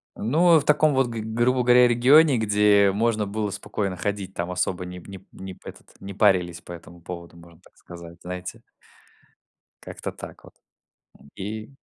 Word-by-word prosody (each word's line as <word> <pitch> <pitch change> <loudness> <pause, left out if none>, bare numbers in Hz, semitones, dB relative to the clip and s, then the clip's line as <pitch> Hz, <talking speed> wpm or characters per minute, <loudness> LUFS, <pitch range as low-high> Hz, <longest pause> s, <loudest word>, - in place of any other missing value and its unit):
Ну, 160 +8 +3
в 145 - -7
таком 150 0 +3
вот, 135 -1 +2
г 115 -2 -5
грубо 120 +3 0
говоря, 125 0 +6
регионе, 130 +4 +5
где 105 -2 +3
можно 110 0 0
было 105 +1 -3
спокойно 100 -1 -4
ходить, 100 0 -4
там 85 +1 -4
особо 90 0 -2
не 90 0 -9
п 90 - -15
не 95 - -8
п 95 - -27
не 95 0 -9
п - - -12
этот, - - -16
не 100 0 -8
парились 90 -4 +2
по 90 - -10
этому 85 0 -13
поводу, 85 0 -9
можно 85 -1 -18
так - - -24
сказать, 85 -1 -12
знаете. 90 0 -7 1.2
Как-то - - -7
так - - -12
вот, - - -16 0.7
м, 70 - -19
и 110 +3 -6
100 Hz, 185 wpm, -24 LUFS, 90-120 Hz, 1.2 s, говоря